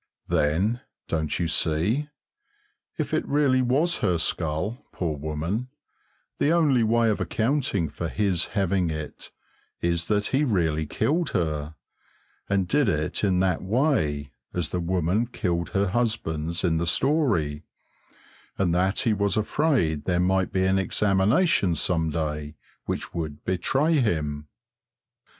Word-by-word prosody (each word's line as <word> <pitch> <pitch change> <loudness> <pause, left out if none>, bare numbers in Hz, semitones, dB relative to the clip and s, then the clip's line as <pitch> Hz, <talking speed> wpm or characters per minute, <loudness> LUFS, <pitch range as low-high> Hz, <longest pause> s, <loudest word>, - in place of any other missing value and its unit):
Then, 95 +11 +1 0.3
don't 80 -2 -1
you 85 - 0
see? 90 - +1 0.9
if - - -3
it - - +1
really 140 -3 +3
was 140 +8 +2
her 90 -2 +1
skull, 85 - -1
poor 80 -4 -2
woman, 80 - -3 0.7
the 145 - +3
only 150 -7 +3
way 115 0 +3
of 105 - -2
accounting 115 - 0
for 80 +3 -5
his 95 -4 0
having 95 -2 +1
it 75 -1 -6 0.5
is 85 -1 0
that 105 -1 +1
he 140 +3 +3
really 80 - 0
killed 160 - 0
her, 75 -2 -2 0.7
and 100 -2 +1
did 145 -2 +2
it 75 +1 -1
in 95 -3 +2
that 95 -3 +1
way, 95 - 0 0.2
as 90 -3 -1
the 90 - -2
woman 90 +5 0
killed 85 -8 -2
her 100 -2 +1
husbands 90 -8 -1
in 85 -3 +2
the 85 +1 -1
story, 90 - +1 1.0
and 90 -3 +1
that 95 +3 +1
he 115 - +2
was 100 -1 0
afraid 110 - +1
there 90 -1 +1
might 95 +1 +1
be 95 0 +1
an 95 +1 +3
examination 100 - +2
some 80 +1 0
day 75 -1 -3 0.3
which - - -4
would 80 -3 -5
betray 135 - +1
him. 75 - -1
95 Hz, 135 wpm, -25 LUFS, 80-115 Hz, 1.0 s, really